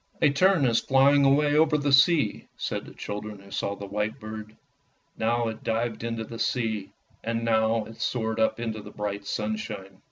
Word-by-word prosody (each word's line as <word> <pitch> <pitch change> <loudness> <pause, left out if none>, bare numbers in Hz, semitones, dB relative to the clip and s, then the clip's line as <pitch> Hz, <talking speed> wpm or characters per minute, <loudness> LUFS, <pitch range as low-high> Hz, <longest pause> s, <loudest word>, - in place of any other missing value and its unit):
" - - -31
A 145 - +6
tern 185 +1 +4
is 115 -2 +3
flying 140 +1 +4
away 145 +2 +4
over 155 0 +4
the 145 -1 0
sea," 150 +2 +4
said - - -3
the - - -12
children 105 0 -6
who 100 0 -16
saw 100 - -2
the 100 - -7
white 105 +2 -2
bird. 110 0 -8 0.6
Now 115 +1 +1
it 110 - -8
dived 115 0 -1
into 115 -1 -3
the 115 0 -8
sea, 110 -5 -1 0.3
and 115 0 -2
now 110 -1 +2
it 115 - -11
soared 110 -2 -1
up 110 - +2
into 110 -2 -3
the 105 - -10
bright 100 -1 -4
sunshine. 105 -3 -4
110 Hz, 190 wpm, -26 LUFS, 105-135 Hz, 0.6 s, A